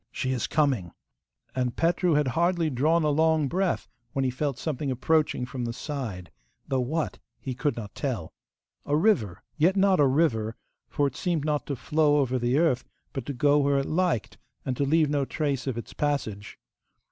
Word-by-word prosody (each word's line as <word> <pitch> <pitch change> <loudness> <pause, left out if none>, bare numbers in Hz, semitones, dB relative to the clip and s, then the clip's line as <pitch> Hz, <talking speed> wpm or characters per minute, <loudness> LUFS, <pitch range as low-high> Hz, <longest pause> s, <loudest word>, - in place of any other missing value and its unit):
She 130 - -2
is 125 -3 -1
coming!' 130 - +1 0.6
And 125 -2 -1
Petru 175 +1 +2
had 145 -3 +2
hardly 170 +3 +1
drawn 155 +6 +2
a 150 - +2
long 160 0 +3
breath 185 +5 0 0.3
when 135 -1 0
he 130 - +1
felt 135 0 -2
something 145 0 -3
approaching 135 0 +1
from 125 -1 -5
the 115 -1 -2
side, 115 - -5 0.4
though 135 - 0
what 155 +6 -2 0.2
he 130 - -4
could 145 +3 -1
not 105 -3 -6
tell. 120 - -3 0.5
A 145 +1 +1
river, 155 - +1
yet 170 +5 +3
not 195 -2 +4
a 145 - +6
river, 125 -6 +1 0.3
for 145 - +1
it 140 -1 -2
seemed 170 -5 -1
not 150 -1 -1
to 140 - -2
flow 150 +3 +2
over 130 -3 +1
the 120 +3 +1
earth, 155 -6 +2 0.3
but 135 - -5
to 140 - -2
go 145 +3 +3
where 140 0 +2
it 135 - 0
liked, 170 - -1 0.3
and 130 - -1
to 140 - 0
leave 155 +2 +3
no 145 -2 +1
trace 140 -2 -2
of 130 -3 -2
its 120 - -7
passage. 110 -9 -2
140 Hz, 190 wpm, -27 LUFS, 125-155 Hz, 0.6 s, a